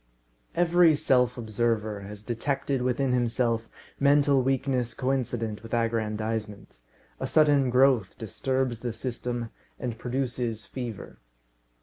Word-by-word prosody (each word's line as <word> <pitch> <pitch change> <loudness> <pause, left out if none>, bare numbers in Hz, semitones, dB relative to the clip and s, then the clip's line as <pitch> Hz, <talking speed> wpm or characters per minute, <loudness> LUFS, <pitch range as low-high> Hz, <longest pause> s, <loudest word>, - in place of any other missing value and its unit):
Every 175 -1 +5
self 125 -5 +2
observer 110 -2 -1
has 100 +1 -9
detected 135 +3 -1
within 125 +1 0
himself 115 -2 +1 0.3
mental 140 -1 +4
weakness 130 -2 0
coincident 120 -5 -1
with 115 +1 -4
aggrandisement. 110 - -2 0.4
A - - -2
sudden 145 -4 +4
growth 125 -5 +3
disturbs 130 +2 -1
the 120 -1 -3
system, 120 0 -4 0.3
and 120 -3 -4
produces 120 -3 -2
fever. 120 - -7
120 Hz, 105 wpm, -27 LUFS, 115-135 Hz, 0.4 s, Every